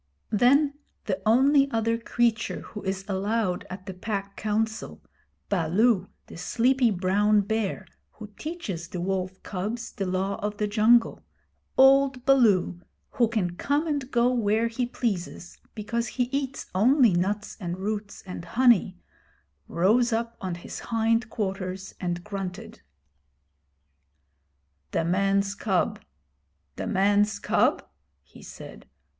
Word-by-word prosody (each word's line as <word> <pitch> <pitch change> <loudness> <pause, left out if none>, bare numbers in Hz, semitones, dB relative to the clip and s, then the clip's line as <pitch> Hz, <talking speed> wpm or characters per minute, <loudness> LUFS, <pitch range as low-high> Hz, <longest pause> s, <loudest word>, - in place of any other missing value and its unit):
Then 280 +6 +3 0.3
the 190 -2 -2
only 275 +4 +5
other 230 -2 0
creature 230 -1 0
who 210 - -9
is 190 0 -3
allowed 200 -1 -1
at 185 0 -8
the 190 - -6
Pack 200 +1 -4
Council 220 +1 -2 0.5
Baloo, 195 +3 +2 0.2
the - - -12
sleepy 245 +7 +2
brown 205 +2 +2
bear 205 -1 -2 0.3
who 215 - -9
teaches 220 - -5
the 180 - -6
wolf 185 +1 -3
cubs 215 +5 -4
the 195 - -4
Law 190 +2 -1
of 210 0 -3
the 210 - 0
Jungle: 220 +3 +3 0.5
old 270 -1 +5
Baloo, 215 -10 +3 0.3
who 235 - +2
can 195 -6 -1
come 290 +7 0
and 285 -5 -2
go 245 -1 +2
where 225 -1 +1
he 240 +1 -2
pleases 205 -8 -4 0.2
because 230 +2 -2
he 250 +3 -1
eats 275 -1 -3
only 240 +3 +4
nuts 200 +4 -1
and 175 -2 -4
roots 205 +1 -4
and 180 -3 -7
honey 215 -2 +3 0.7
rose 225 +8 +2
up 230 +1 -1
on 185 -2 -3
his 170 - -8
hind 225 0 0
quarters 190 -3 -4
and 175 -1 -3
grunted. 190 - -6 2.1
'The 165 - +1
man's 195 +2 +1
cub 195 -2 0 0.8
the - - -4
man's 205 +2 +2
cub?' - - +1 0.4
he - - -17
said. - - -11
210 Hz, 125 wpm, -26 LUFS, 190-235 Hz, 2.1 s, only